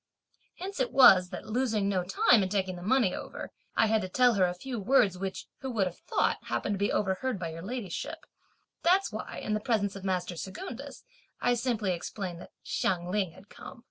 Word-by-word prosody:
Hence 380 -2 -6
it 260 - 0
was 185 -9 +7
that, 180 - -7
losing 220 -3 0
no 190 -2 +1
time 195 +5 +4
in 190 - 0
taking 190 -2 -1
the 175 - -9
money 220 0 +2
over, - - -7 0.2
I - - +4
had 220 0 +2
to 185 - -4
tell 245 +4 +4
her 195 -3 +3
a 180 0 -1
few 245 +5 -5
words 220 -3 +3
which, 190 +1 -5
who 265 - -5
would 220 -6 +1
have 180 -1 -5
thought, - - 0
happened 205 - -1
to 195 - -3
be 200 - +1
overheard 205 +5 0
by 170 -2 -4
your 165 +1 -7
ladyship; 205 -2 -5 0.6
that's 375 +3 +3
why, - - -6
in 215 - -3
the 215 - +1
presence 205 -3 0
of 195 - -8
master 180 -2 -1
Secundus, 240 - -7 0.4
I 245 - +2
simply 230 -5 0
explained 175 0 -4
that - - -11
Hsiang 175 -1 -1
Ling 190 -4 0
had 195 +3 -16
come!" 255 - -11
200 Hz, 205 wpm, -29 LUFS, 185-245 Hz, 0.6 s, was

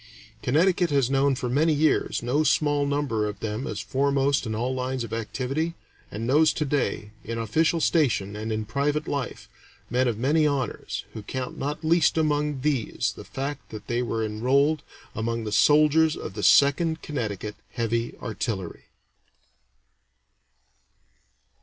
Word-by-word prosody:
Connecticut 175 +6 +2
has 135 -3 +2
known 135 0 +3
for 130 -1 -3
many 150 +6 +2
years 155 -4 +1
no 135 +6 +1
small 145 -2 +2
number 140 -7 0
of 105 - -6
them 110 +5 -3
as - - -4
foremost 140 -1 +1
in 110 - -2
all 125 +4 -1
lines 130 0 -2
of 115 - -7
activity, 135 +8 -2 0.3
and 110 +3 -5
knows 150 +5 +4
to 150 - -1
day, 135 -7 -1
in 115 +1 -4
official 155 +10 +1
station 125 - +1
and 110 +1 -4
in 110 0 -2
private 145 +7 -1
life, 140 -3 -4 0.4
men 125 +1 +2
of 115 -3 -1
many 150 +6 +3
honors, 135 -5 -3
who 110 - -6
count 125 +4 -5
not 145 +4 -4
least 165 +1 +3
among 150 -3 +1
these 140 -5 0
the - - -9
fact 140 +1 -5
that 105 -1 -8
they 120 +1 -1
were 115 -2 -1
enrolled 135 +8 +2 0.3
among 115 +1 -2
the 105 - -4
soldiers 155 +5 +4
of - - -7
the - - -5
Second 160 +3 +4
Connecticut 105 -7 -4 0.2
Heavy 115 0 -1
Artillery. 105 -5 -4
135 Hz, 150 wpm, -25 LUFS, 115-150 Hz, 0.4 s, knows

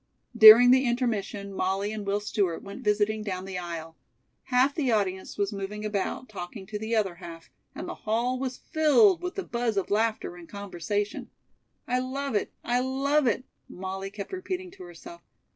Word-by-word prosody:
During 230 +2 +10
the 260 +1 +5
intermission, 220 -5 -2
Molly 195 +2 -1
and 210 -2 -6
Will 200 +1 +1
Stewart 200 -5 -1
went 200 0 -9
visiting 210 +1 +1
down 190 -3 -4
the 190 -1 -5
aisle. 165 -2 -6 0.5
Half 260 +2 +3
the 275 -6 0
audience 190 -3 -1
was 200 +1 -1
moving 205 +2 -5
about, 210 +4 -2
talking 190 -1 -8
to 210 +1 -5
the 220 +2 -2
other 200 -5 +1
half, 170 -2 -11 0.2
and 330 +5 -6
the 355 - -4
hall 240 +4 -1
was 260 -1 -3
filled 325 +5 +4
with 360 0 -4
the 390 - -3
buzz 235 -6 -2
of 195 - -1
laughter 215 -3 0
and 170 -1 -13
conversation. 200 +1 -4 0.6
"I 250 +1 +1
love 270 +1 -3
it! 205 - -1
I 245 +1 +1
love 270 +2 +1
it!" 255 +2 0 0.2
Molly 190 +1 -5
kept 200 - -8
repeating 370 -1 -4
to 185 - -12
herself. 340 - -12
215 Hz, 175 wpm, -27 LUFS, 195-255 Hz, 0.6 s, During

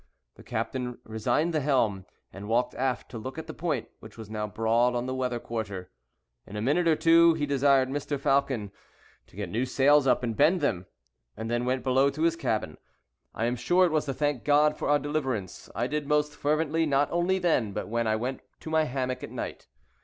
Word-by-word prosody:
The - - -16
captain 125 -2 -3
resigned 115 +10 0
the 155 - +2
helm, 115 -9 +1 0.3
and 100 +2 -8
walked 120 +2 +1
aft 130 -1 -2
to 115 - -6
look 130 +6 -7
at 160 - -5
the - - -7
point, 150 -9 -2
which 110 0 -13
was 110 -2 -9
now 105 -1 -3
broad 115 +3 +1
on 120 0 -1
the 130 - -3
weather 125 -2 -2
quarter. 100 -6 -5 0.6
In 105 - -9
a 105 - -3
minute 170 +7 +2
or 160 - +5
two, 165 +1 +5
he 150 -2 -1
desired 140 -1 +3
Mr. 145 +1 -3
Falcon 135 -7 +1 0.6
to - - -21
get 100 -1 -4
new 115 +4 0
sails 140 +2 +4
up 125 - +3
and 115 -2 -2
bend 160 - +4
them, 95 - -1 0.5
and 115 +1 -4
then 120 +1 0
went 130 +1 -1
below 135 +1 +3
to 155 +3 -3
his 165 0 +3
cabin. 110 - -2 0.6
I 115 - -1
am 120 +1 0
sure 175 +10 +3
it 175 - 0
was 155 -1 +1
to 135 - -2
thank 145 -4 -1
God 150 +1 +4
for - - -3
our 145 - +5
deliverance: 135 - -3
I 120 - 0
did 150 +2 -3
most 150 0 +1
fervently, 155 +2 0
not 140 0 +2
only 175 +2 +1
then, 160 - +1
but - - -4
when 115 +1 -1
I 110 - +2
went 125 +4 -3 0.2
to 160 - -7
my 160 -1 +3
hammock 130 -1 -3
at - - -6
night. - - -6
130 Hz, 215 wpm, -27 LUFS, 115-150 Hz, 0.6 s, or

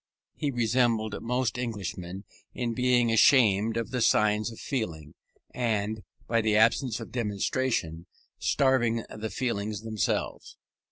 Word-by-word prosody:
He 145 - -2
resembled 115 -3 +1
most 125 0 -1
Englishmen 95 -5 -5 0.3
in 120 -2 -2
being 125 -1 +2
ashamed 115 -2 +4
of 115 - -3
the 125 -2 -1
signs 105 0 +3
of 115 - -11
feeling, 80 - -4 0.4
and, 110 -3 -1 0.3
by 115 0 +2
the 110 -1 +1
absence 115 +2 +3
of - - -9
demonstration, 105 -6 -2 0.3
starving 120 -4 +2
the 110 +1 -4
feelings 105 -5 -3
themselves. 110 -3 -3
115 Hz, 120 wpm, -27 LUFS, 105-125 Hz, 0.4 s, ashamed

